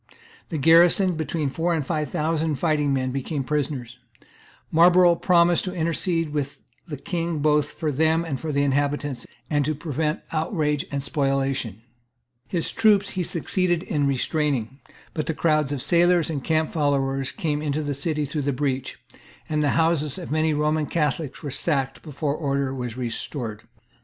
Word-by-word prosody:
The 160 Hz, -, -3 dB
garrison, 170 Hz, +5 st, +5 dB
between 155 Hz, -2 st, -2 dB
four 165 Hz, +5 st, 0 dB
and 155 Hz, -4 st, -2 dB
five 150 Hz, -2 st, -2 dB
thousand 160 Hz, +1 st, 0 dB
fighting 150 Hz, 0 st, +1 dB
men, 130 Hz, -1 st, 0 dB
became 135 Hz, +2 st, -3 dB
prisoners. 130 Hz, -4 st, -3 dB, 0.7 s
Marlborough 175 Hz, +2 st, +6 dB
promised 170 Hz, 0 st, +3 dB
to 185 Hz, 0 st, -4 dB
intercede 165 Hz, 0 st, 0 dB
with 145 Hz, -2 st, -3 dB, 0.3 s
the 150 Hz, -3 st, -5 dB
King 165 Hz, +3 st, -3 dB
both 150 Hz, 0 st, +2 dB
for 155 Hz, -2 st, -3 dB
them 160 Hz, +4 st, +2 dB
and 140 Hz, -6 st, -3 dB
for 160 Hz, +2 st, -3 dB
the 140 Hz, 0 st, +1 dB
inhabitants, 145 Hz, -1 st, -1 dB, 0.2 s
and 145 Hz, -1 st, +1 dB
to 155 Hz, +2 st, -1 dB
prevent 150 Hz, +1 st, -2 dB
outrage 155 Hz, -3 st, -1 dB
and 140 Hz, -1 st, -2 dB
spoliation. 135 Hz, -, -1 dB, 0.6 s
His 170 Hz, -3 st, -2 dB
troops 210 Hz, -3 st, +3 dB
he 185 Hz, -, -2 dB
succeeded 175 Hz, +1 st, 0 dB
in 145 Hz, -6 st, 0 dB
restraining; 135 Hz, -2 st, -1 dB, 0.3 s
but 155 Hz, 0 st, -3 dB
crowds 155 Hz, -3 st, +2 dB
of 140 Hz, -3 st, -1 dB
sailors 175 Hz, -1 st, +3 dB
and 140 Hz, -4 st, -3 dB
camp 160 Hz, -1 st, +1 dB
followers 135 Hz, -3 st, 0 dB
came 150 Hz, -3 st, -2 dB
into 150 Hz, 0 st, -1 dB
the 145 Hz, -1 st, -2 dB
city 150 Hz, +2 st, 0 dB
through 145 Hz, +2 st, -3 dB
the 140 Hz, 0 st, 0 dB
breach; 135 Hz, -1 st, -2 dB, 0.5 s
and 155 Hz, -1 st, 0 dB
the 145 Hz, -, +2 dB
houses 160 Hz, -3 st, +2 dB
of 175 Hz, -5 st, -7 dB
many 155 Hz, +1 st, +2 dB
Roman 150 Hz, 0 st, +1 dB
Catholics 150 Hz, -2 st, -2 dB
were 145 Hz, -, -4 dB
sacked 135 Hz, 0 st, -1 dB
before 145 Hz, -1 st, -3 dB
order 140 Hz, -3 st, -1 dB
was 125 Hz, -2 st, -5 dB
restored. 115 Hz, -2 st, -5 dB
150 Hz, 160 wpm, -24 LUFS, 140-165 Hz, 0.7 s, Marlborough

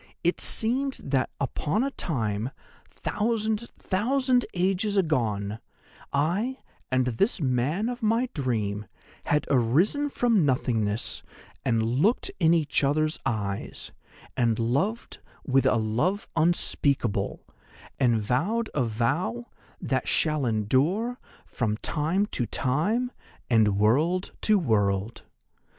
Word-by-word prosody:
It 175 Hz, -, +1 dB
seemed 260 Hz, +5 st, +2 dB
that 135 Hz, -1 st, 0 dB
upon 150 Hz, -, -1 dB
a 275 Hz, -, -1 dB
time, 115 Hz, -, -2 dB, 0.4 s
thousand, 220 Hz, +1 st, -1 dB
thousand 250 Hz, +5 st, +1 dB
ages 195 Hz, +3 st, +1 dB
agone, 110 Hz, -, 0 dB, 0.5 s
I 185 Hz, -, 0 dB, 0.3 s
and 130 Hz, -1 st, +2 dB
this 160 Hz, -, 0 dB
man 140 Hz, -, 0 dB
of 245 Hz, 0 st, -4 dB
my 230 Hz, +3 st, +2 dB
dream 110 Hz, -7 st, -2 dB, 0.4 s
had 150 Hz, -, +1 dB
arisen 160 Hz, -, +2 dB
from 235 Hz, -, +2 dB
nothingness 115 Hz, -6 st, 0 dB, 0.4 s
and 115 Hz, -2 st, +1 dB
looked 140 Hz, -, +1 dB
in 165 Hz, -3 st, +4 dB
each 150 Hz, -3 st, +1 dB
other's 155 Hz, +3 st, +1 dB
eyes, 100 Hz, -4 st, -4 dB, 0.4 s
and 115 Hz, -3 st, +2 dB
loved 140 Hz, -, -1 dB, 0.3 s
with 135 Hz, -1 st, +3 dB
a -, -, +3 dB
love 120 Hz, -, 0 dB
unspeakable, 140 Hz, -, 0 dB, 0.5 s
and 120 Hz, -3 st, +3 dB
vowed 170 Hz, -, 0 dB
a 140 Hz, -, +1 dB
vow 120 Hz, +2 st, -1 dB, 0.3 s
that -, -, -1 dB
shall 155 Hz, -4 st, +1 dB
endure 145 Hz, -, +1 dB, 0.3 s
from 110 Hz, -3 st, -2 dB
time 165 Hz, -, 0 dB
to 120 Hz, -, -2 dB
time 205 Hz, -, 0 dB, 0.4 s
and 105 Hz, -4 st, +4 dB
world 155 Hz, -, +2 dB
to 215 Hz, -1 st, +4 dB
world. 105 Hz, -, 0 dB
145 Hz, 110 wpm, -26 LUFS, -, 0.5 s, in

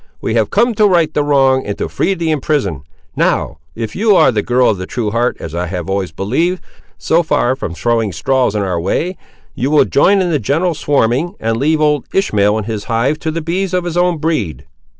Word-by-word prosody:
We 110 Hz, -, -2 dB
have 110 Hz, -3 st, +1 dB
come 235 Hz, +3 st, +2 dB
to 210 Hz, 0 st, +3 dB
right 170 Hz, -5 st, +2 dB
the 150 Hz, -, +1 dB
wronged 135 Hz, -2 st, +2 dB
and 100 Hz, -, -3 dB
to -, -, -2 dB
free 195 Hz, -, -1 dB
the 165 Hz, -2 st, -1 dB
imprisoned; 135 Hz, -, -1 dB, 0.3 s
now, -, -, 0 dB, 0.2 s
if 110 Hz, -2 st, -5 dB
you 210 Hz, 0 st, +3 dB
are -, -, +5 dB
the 105 Hz, -3 st, 0 dB
girl 125 Hz, +3 st, +2 dB
of 100 Hz, -, -4 dB
a 95 Hz, -, -5 dB
true 115 Hz, -4 st, -3 dB
heart, 120 Hz, +2 st, 0 dB
as 80 Hz, -, -7 dB
I 90 Hz, +1 st, -2 dB
have 90 Hz, +1 st, -4 dB
always 95 Hz, -3 st, -2 dB
believed, 150 Hz, -, -1 dB, 0.3 s
so 165 Hz, +2 st, +2 dB
far 145 Hz, -6 st, +1 dB
from 90 Hz, -10 st, -5 dB
throwing 115 Hz, +3 st, 0 dB
straws 125 Hz, +7 st, 0 dB
in 105 Hz, -, 0 dB
our 90 Hz, -3 st, -2 dB
way, 175 Hz, -, -1 dB, 0.4 s
you 130 Hz, -, -2 dB
will 150 Hz, 0 st, +4 dB
join 195 Hz, +8 st, +3 dB
in 180 Hz, -2 st, 0 dB
the 150 Hz, -, +1 dB
general 160 Hz, -, 0 dB
swarming, 145 Hz, -, 0 dB
and 115 Hz, 0 st, -1 dB
leave 155 Hz, +5 st, +1 dB
old 150 Hz, -3 st, +1 dB
Ishmael 105 Hz, -, +2 dB
and 110 Hz, -, -3 dB
his 110 Hz, -2 st, -4 dB
hive 125 Hz, +6 st, 0 dB
to 160 Hz, -, -3 dB
the 165 Hz, +1 st, -3 dB
bees 185 Hz, +3 st, -1 dB
of 180 Hz, -, 0 dB
his 175 Hz, -1 st, -4 dB
own 175 Hz, -1 st, +2 dB
breed." 115 Hz, -, -2 dB
135 Hz, 225 wpm, -16 LUFS, 105-165 Hz, 0.4 s, are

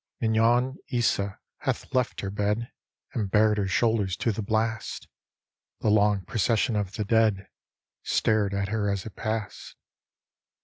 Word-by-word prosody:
Mignon 120 Hz, +4 st, +2 dB
Isa 100 Hz, -5 st, 0 dB, 0.2 s
hath -, -, -3 dB
left 125 Hz, -2 st, 0 dB
her 100 Hz, -, -3 dB
bed 105 Hz, +3 st, -1 dB, 0.4 s
And 105 Hz, -4 st, -1 dB
bared 105 Hz, +1 st, +3 dB
her 100 Hz, -, 0 dB
shoulders 105 Hz, -2 st, +1 dB
to 115 Hz, -, +1 dB
the 110 Hz, -, -3 dB
blast; 110 Hz, +1 st, -2 dB, 0.7 s
The -, -, +2 dB
long 105 Hz, -2 st, +3 dB
procession 115 Hz, +2 st, +1 dB
of 100 Hz, -2 st, -2 dB
the 105 Hz, -, -2 dB
dead 105 Hz, -3 st, +2 dB, 0.5 s
Stared 110 Hz, -3 st, +1 dB
at 100 Hz, 0 st, -1 dB
her 105 Hz, -2 st, 0 dB
as 100 Hz, -2 st, -2 dB
it 110 Hz, -, -9 dB
passed. 110 Hz, -1 st, -4 dB
110 Hz, 140 wpm, -27 LUFS, 100-115 Hz, 0.7 s, bared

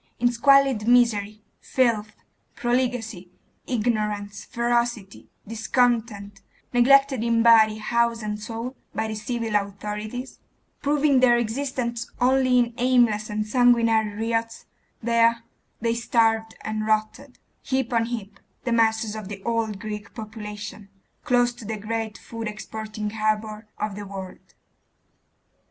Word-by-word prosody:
In 240 Hz, +1 st, +3 dB
squalid 270 Hz, -2 st, +4 dB
misery, 215 Hz, -4 st, +3 dB, 0.2 s
filth, 225 Hz, -4 st, 0 dB, 0.4 s
profligacy, 240 Hz, -6 st, -1 dB, 0.4 s
ignorance, 210 Hz, -4 st, -1 dB
ferocity, 235 Hz, -4 st, -2 dB, 0.2 s
discontent, 225 Hz, -3 st, 0 dB, 0.3 s
neglected 270 Hz, 0 st, +5 dB
in 230 Hz, -1 st, +2 dB
body, 220 Hz, -2 st, +6 dB
house, 235 Hz, +1 st, 0 dB
and 210 Hz, 0 st, -3 dB
soul, 230 Hz, +4 st, -5 dB, 0.2 s
by 220 Hz, -, -1 dB
the 220 Hz, -, -4 dB
civil 225 Hz, 0 st, -3 dB
authorities, 210 Hz, +5 st, -4 dB, 0.4 s
proving 290 Hz, -1 st, +3 dB
their 245 Hz, -2 st, +5 dB
existence 235 Hz, 0 st, -2 dB
only 255 Hz, 0 st, +3 dB
in 240 Hz, -1 st, +2 dB
aimless 240 Hz, -4 st, +3 dB
and 210 Hz, 0 st, -2 dB
sanguinary 230 Hz, -3 st, +3 dB, 0.2 s
riots, 230 Hz, 0 st, -2 dB, 0.4 s
there 230 Hz, 0 st, +3 dB, 0.4 s
they 230 Hz, 0 st, +1 dB
starved 225 Hz, -1 st, +1 dB
and 215 Hz, 0 st, -3 dB
rotted, 220 Hz, +5 st, -1 dB, 0.2 s
heap 265 Hz, -3 st, -1 dB
on 230 Hz, -1 st, +2 dB
heap, 215 Hz, -4 st, -6 dB, 0.2 s
the 240 Hz, -, -2 dB
masses 220 Hz, -1 st, +2 dB
of 215 Hz, -3 st, -6 dB
the 195 Hz, -1 st, -8 dB
old 230 Hz, -3 st, -1 dB
Greek 210 Hz, -1 st, -7 dB
population, 210 Hz, -2 st, -8 dB, 0.4 s
close 245 Hz, -1 st, +3 dB
to 240 Hz, -, -12 dB
the 215 Hz, +1 st, -4 dB
great 220 Hz, +1 st, -4 dB
food 230 Hz, -1 st, -7 dB
exporting 215 Hz, 0 st, -5 dB
harbour 215 Hz, 0 st, -2 dB
of 210 Hz, -1 st, -3 dB
the 205 Hz, 0 st, -7 dB
world. 190 Hz, -1 st, -9 dB
225 Hz, 120 wpm, -24 LUFS, 215-240 Hz, 0.4 s, body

